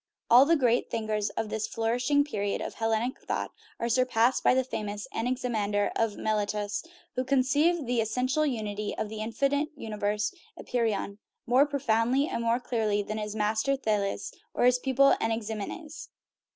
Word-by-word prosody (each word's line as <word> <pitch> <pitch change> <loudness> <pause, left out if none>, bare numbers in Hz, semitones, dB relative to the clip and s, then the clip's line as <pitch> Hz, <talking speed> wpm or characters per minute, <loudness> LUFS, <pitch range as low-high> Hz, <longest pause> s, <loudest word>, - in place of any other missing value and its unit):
All 250 +3 +9
the 335 +3 +4
great 245 -5 +2
thinkers 215 -2 -1
of 225 -1 -1
this 220 0 -2
flour 225 +1 -1
ishing 285 +3 +2
period 205 -8 -2
of - - -5
Hellenic 225 +2 -1
thought - - -3 0.3
are 235 - -1
surpassed 250 0 +2
by - - +5
the 260 - +3
famous 210 -4 -5
Anaximander, 225 -4 0
of 225 -2 0
Miletus, 210 -1 -1 0.3
who 255 - -1
conceived 280 +5 +2
the 240 -1 +1
essential 250 +7 0
unity 215 -6 -2
of 210 - -2
the 215 0 -6
infinite 275 +7 0
universe 210 - -2 0.2
(apeiron) 215 -4 -2 0.3
more 255 +4 +4
profoundly 260 0 +1
and 235 - -3
more 230 +1 +2
clearly 220 -4 0
than 215 +2 -4
his 210 0 -4
master, 220 +5 +1
Thales, 210 -6 -1 0.2
or - - +2
his 250 0 +5
pupil, 270 +1 +4
Anaximenes. 225 - -4
230 Hz, 155 wpm, -28 LUFS, 215-255 Hz, 0.3 s, All